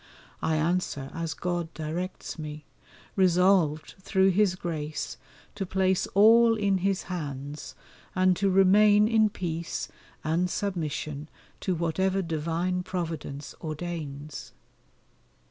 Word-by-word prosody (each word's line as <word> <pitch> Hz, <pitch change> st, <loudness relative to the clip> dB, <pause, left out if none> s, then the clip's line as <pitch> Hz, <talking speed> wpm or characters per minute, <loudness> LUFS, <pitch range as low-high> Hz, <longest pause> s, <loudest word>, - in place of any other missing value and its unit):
I 160 Hz, -, +1 dB
answer 155 Hz, -4 st, -1 dB
as 165 Hz, -2 st, -3 dB
God 175 Hz, -2 st, -2 dB
directs 165 Hz, +3 st, -4 dB
me, 150 Hz, -1 st, -7 dB, 0.5 s
resolved 180 Hz, -4 st, +3 dB
through 190 Hz, 0 st, +3 dB
His 190 Hz, 0 st, +3 dB
grace 155 Hz, -7 st, -4 dB, 0.4 s
to 200 Hz, -, -3 dB
place 190 Hz, 0 st, +1 dB
all 225 Hz, +3 st, +7 dB
in 200 Hz, -3 st, +1 dB
His 195 Hz, +1 st, 0 dB
hands 145 Hz, -4 st, -6 dB, 0.4 s
and 185 Hz, 0 st, +4 dB
to 195 Hz, +1 st, +2 dB
remain 205 Hz, +2 st, +6 dB
in 220 Hz, -1 st, +4 dB
peace 170 Hz, -4 st, -4 dB, 0.3 s
and 165 Hz, +4 st, +1 dB
submission 155 Hz, -6 st, -3 dB, 0.3 s
to 185 Hz, -, -1 dB
whatever 190 Hz, +4 st, 0 dB
divine 170 Hz, +3 st, -1 dB
Providence 165 Hz, -6 st, -5 dB
ordains. 155 Hz, -3 st, -6 dB
175 Hz, 110 wpm, -27 LUFS, 155-190 Hz, 0.5 s, all